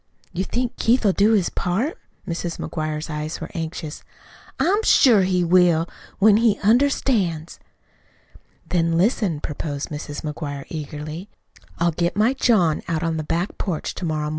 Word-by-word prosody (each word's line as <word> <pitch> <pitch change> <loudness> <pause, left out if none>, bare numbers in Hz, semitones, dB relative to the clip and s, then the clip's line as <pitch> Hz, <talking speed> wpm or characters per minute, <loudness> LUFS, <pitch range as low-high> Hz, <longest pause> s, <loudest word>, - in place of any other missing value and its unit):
"You 185 - -1
think 245 +3 -2
Keith'll 230 -3 +3
do 210 +4 +4
his 195 -5 +2
part?" 215 - -1 0.3
Mrs. 170 -1 -3
McGuire's 155 -1 -4
eyes 155 0 -4
were 160 - -7
anxious. 160 -2 -5 0.6
"I'm 400 +6 +2
sure 245 - +5
he 185 -1 +1
will 175 -1 +4 0.3
when 205 +1 +6
he 225 -2 +3
understands." 215 - +1 1.1
"Then 165 -2 +1
listen," 190 - +1
proposed 145 -1 -4
Mrs. 145 -1 -6
McGuire 145 -2 -5
eagerly. 155 +4 -6 0.5
"I'll 170 +1 +2
get 170 +2 -1
my 220 +5 +3
John 210 - +2
out 165 0 -1
on 165 - 0
to 160 - -2
the 155 - -2
back 170 +5 -2
porch 175 -6 -3
to - - -8
morrow 155 -2 -1
mornin'. 150 - -2
170 Hz, 155 wpm, -22 LUFS, 155-210 Hz, 1.1 s, when